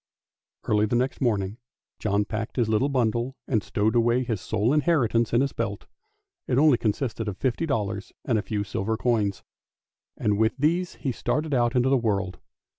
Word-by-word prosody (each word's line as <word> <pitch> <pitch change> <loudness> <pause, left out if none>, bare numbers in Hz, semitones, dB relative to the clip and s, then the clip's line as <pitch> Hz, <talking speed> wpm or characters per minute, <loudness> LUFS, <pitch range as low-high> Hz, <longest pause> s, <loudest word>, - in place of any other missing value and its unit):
Early 105 0 +2
next 125 +5 0
morning 105 -4 0 0.4
John 105 -1 +1
packed 110 +2 -4
his 120 -4 +1
little 110 +6 +2
bundle 120 0 0
and 110 -5 +1
stowed 110 +2 0
away 120 +2 +3
his 115 -6 -3
sole 110 +7 +1
inheritance 135 -8 +2
in 120 - +3
his 140 0 0
belt; 105 -3 -3 0.6
it 125 - +1
only 145 -4 +5
consisted 115 0 -1
of 100 -2 -4
fifty 135 +5 -1
dollars 105 -5 -2
and 115 -4 +2
a - - -1
few 105 +1 -2
silver 105 +2 -2
coins, 110 -5 0 0.7
and 105 -1 0
with 110 +3 +2
these 170 +5 +1
he 135 - -2
started 150 +5 -1
out 120 0 +2
into 125 +1 +3
the 135 - +4
world. 100 -5 -1
115 Hz, 175 wpm, -26 LUFS, 105-130 Hz, 0.7 s, only